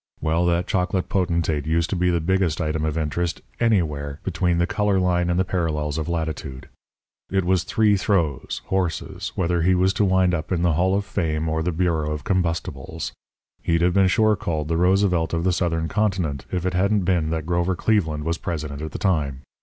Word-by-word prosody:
Well, 85 +2 +1
that 85 +1 +1
chocolate 90 0 -1
potentate 85 -5 0
used 80 +1 +1
to - - 0
be 90 0 +2
the 85 -1 +2
biggest 90 -1 +1
item 80 -1 -1
of 80 0 -2
interest 80 +2 -2 0.2
anywhere 75 -11 0
between 90 -1 0
the 85 - +3
colour 105 0 +1
line 90 -1 +1
and 85 +1 +1
the 95 - +2
parallels 80 -4 -1
of 80 - -3
latitude. 80 -5 -4 0.6
It 95 -1 0
was 90 -1 +2
three 105 +1 +3
throws, 85 -8 -1
horses, 90 -5 -2
whether 85 -1 +1
he 90 +3 +3
was 95 +2 +2
to 105 - +1
wind 95 -2 +3
up 80 0 -3
in 85 -2 +1
the 85 -2 +3
Hall 95 +5 +2
of 100 0 -1
Fame 80 -6 -1
or 80 0 0
the 90 +2 0
Bureau 80 -3 0
of 75 - -6
Combustibles. 85 -7 -2 0.5
He'd 85 0 +1
have 90 0 +3
been 95 0 +4
sure 110 +2 +3
called 80 -5 -3
the 80 - +1
Roosevelt 90 -2 +2
of 85 - -1
the 95 0 +2
Southern 85 -2 0
Continent 90 -9 -1
if 90 -1 -2
it 90 - 0
hadn't 100 +2 +2
been 85 -4 +1
that 80 -1 -2
Grover 85 +2 0
Cleveland 80 -7 0
was 85 +2 -2
President 75 -5 -4
at 80 0 -6
the - - -3
time. 75 -9 0
85 Hz, 200 wpm, -23 LUFS, 80-95 Hz, 0.6 s, been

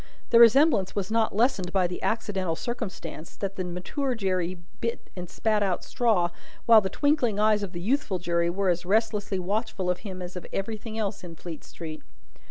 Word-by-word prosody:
The 230 - +7
resemblance 235 - +6
was 200 0 -2
not 225 -3 +1
lessened 215 -6 +2
by 190 -2 +2
the 180 0 -4
accidental 195 -6 -1
circumstance, 205 -8 -6
that 195 -1 -4
the 185 - -2
mature 185 - -2
Jerry 185 -4 -1 0.2
bit 230 0 -4
and 180 -2 -6
spat 215 -1 +1
out 190 -3 0
straw, 215 -9 +1 0.3
while 225 -2 +8
the 190 - -2
twinkling 260 - +1
eyes 210 0 +3
of 200 -3 -4
the 175 -2 -6
youthful 215 -2 0
Jerry 170 -1 0
were 190 +2 0
as 175 0 +1
restlessly 210 0 +1
watchful 195 0 -1
of 180 - -3
him 190 -4 -7
as 180 0 -7
of 180 - -7
everything 220 +2 -4
else 205 -2 -2
in 170 -2 -8
Fleet 165 -1 -8
street. 160 -2 -8
195 Hz, 185 wpm, -27 LUFS, 180-225 Hz, 0.3 s, while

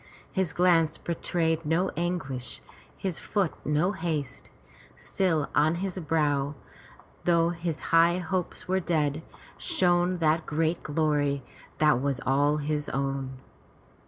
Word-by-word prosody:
His 190 -4 0
glance 165 -3 +3
betrayed 165 -1 -1
no 165 +5 +1
anguish, 165 -8 -3 0.4
his 185 -4 -3
foot 195 -6 0
no 150 +6 +1
haste. 155 -8 -4 0.5
Still 165 -6 0
on 155 +3 +3
his 185 +1 -3
brow, 150 -3 0 0.7
though 170 -1 +4
his 170 -2 -3
high 170 +1 +6
hopes 180 0 -3
were 190 +1 +2
dead, 155 -4 0 0.4
shone 180 0 +2
that 160 -1 +1
great 160 +2 0
glory 145 -2 0 0.3
that 150 -5 +4
was 140 -2 0
all 145 +3 +3
his 150 0 -2
own. 135 -1 -2
160 Hz, 120 wpm, -27 LUFS, 145-175 Hz, 0.7 s, high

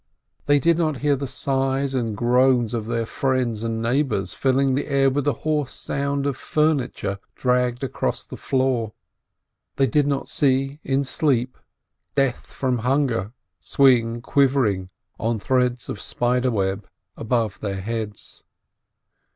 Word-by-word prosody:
They 145 0 +5
did 165 +3 +2
not 155 -4 +1
hear 145 -1 +3
the 140 0 -4
sighs 135 +1 0
and 115 -5 -1
groans 125 -1 +3
of 110 -2 -3
their 115 -1 -1
friends 125 -3 -1
and 115 0 -2
neigh 125 +5 +2
bors, 95 -10 -2
filling 135 0 +2
the 140 - -1
air 135 -1 +3
with 145 +1 -1
the 145 - +2
hoarse 150 -3 0
sound 140 0 -2
of 140 -2 0
furniture 140 -12 0 0.2
dragged 125 0 +1
across 135 - -2
the - - -9
floor; 130 -5 0 0.8
they 135 - +3
did 140 +3 +2
not 140 -1 -1
see, 135 +1 +1
in 135 +1 +1
sleep, 130 -2 0 0.6
Death 135 -3 0
from 130 -3 -1
hunger 125 -5 0 0.3
swing 120 +4 +3
quivering, 120 -9 +2 0.3
on 115 0 -1
threads 125 +3 0
of 105 - -5
spider 125 +1 0
web, 95 -3 -2 0.3
above 115 -3 -1
their 100 -2 -3
heads. 110 0 -5
130 Hz, 145 wpm, -23 LUFS, 115-140 Hz, 0.8 s, They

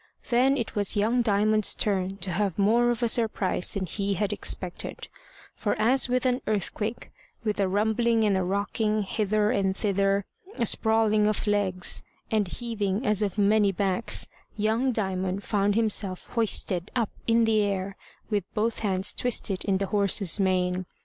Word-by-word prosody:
Then 260 +3 +3
it 235 -4 -4
was 205 0 +2
young 230 +4 +2
Diamond's 215 -1 +2
turn 195 -2 -1
to 190 - -3
have 195 -1 -1
more 230 +4 +3
of 240 0 -1
a - - +3
surprise 220 -6 0
than 195 -2 -2
he 200 +3 -2
had 205 +2 -1
expected; 185 -3 -3 0.5
for - - -2
as 255 +4 +3
with 255 +1 0
an 250 0 +1
earthquake, 215 +2 -3 0.3
with 210 -2 -2
a 195 - +2
rumbling 220 +3 +1
and 205 -2 +2
a 190 - 0
rocking 205 +3 -1
hither 210 +1 0
and 195 -3 0
thither, 200 -1 0 0.3
a 235 - 0
sprawling 220 -1 +2
of 215 0 -1
legs 200 -3 +1 0.3
and 215 -3 +1
heaving 215 0 -3
as 210 -2 +2
of 205 -1 -2
many 205 0 +3
backs, 195 +3 -1 0.3
young 220 +5 +1
Diamond 190 -3 -2
found 205 -1 0
himself 210 -4 0
hoisted 200 -5 +1
up 230 -4 0 0.2
in 230 0 +4
the 220 -1 +3
air, 195 -1 -2 0.3
with 205 -3 -1
both 225 +2 0
hands 195 -2 0
twisted 215 -6 -1
in 195 -2 +1
the 195 - -1
horse's 200 -2 +1
mane. 185 -1 0
210 Hz, 165 wpm, -26 LUFS, 195-225 Hz, 0.5 s, in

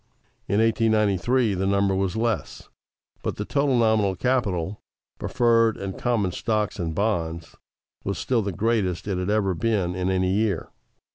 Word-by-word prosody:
In 100 - +1
1893, 110 0 +2
the 95 +1 -1
number 100 0 +2
was 95 0 -1
less, 115 -2 -2 0.5
but - - -3
the 105 - -4
total 140 0 +1
nominal 110 -4 +2
capital 100 -5 -1 0.4
(preferred 115 -2 +2
and 95 -1 -5
common 115 -7 0
stocks 105 +2 -1
and 80 -2 -3
bonds) 85 -6 -2 0.5
was 100 -2 -2
still 120 +6 0
the 100 -1 -2
greatest 100 -4 0
it 95 -3 -1
had 90 +2 -2
ever 105 -3 +1
been 100 -3 0
in 90 0 -1
any 95 -1 +1
year. 100 -4 0
100 Hz, 150 wpm, -24 LUFS, 95-115 Hz, 0.5 s, 1893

